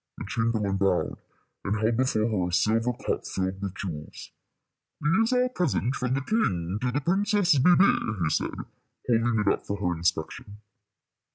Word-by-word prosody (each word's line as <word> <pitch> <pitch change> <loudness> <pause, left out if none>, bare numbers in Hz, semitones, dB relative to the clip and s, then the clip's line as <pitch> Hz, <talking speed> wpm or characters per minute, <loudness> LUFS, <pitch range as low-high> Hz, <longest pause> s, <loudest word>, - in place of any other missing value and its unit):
The - - -6
chamberlain 110 -3 0
bowed, 95 -2 0 0.4
and 105 +2 -1
held 110 +1 +1
before 125 -4 +1
her 95 -6 0
a - - -5
silver 110 +7 +2
cup - - -1
filled 95 +1 -3
with 100 -1 -4
jewels. 80 -7 -7 0.7
"These 190 +10 +2
are 250 0 +3
a 250 - 0
present 160 - 0
from 125 -1 -1
the 135 - -1
king 95 - -1
to 125 -1 0
the 145 +4 -1
Princess 190 -1 +2
Bébè," 155 - +3
he 80 - +1
said, - - 0 0.6
holding 115 -1 +2
it 105 - -2
up - - -7
for 100 - -2
her 90 -3 -1
inspection. 85 +4 -3
115 Hz, 170 wpm, -26 LUFS, 95-140 Hz, 0.7 s, are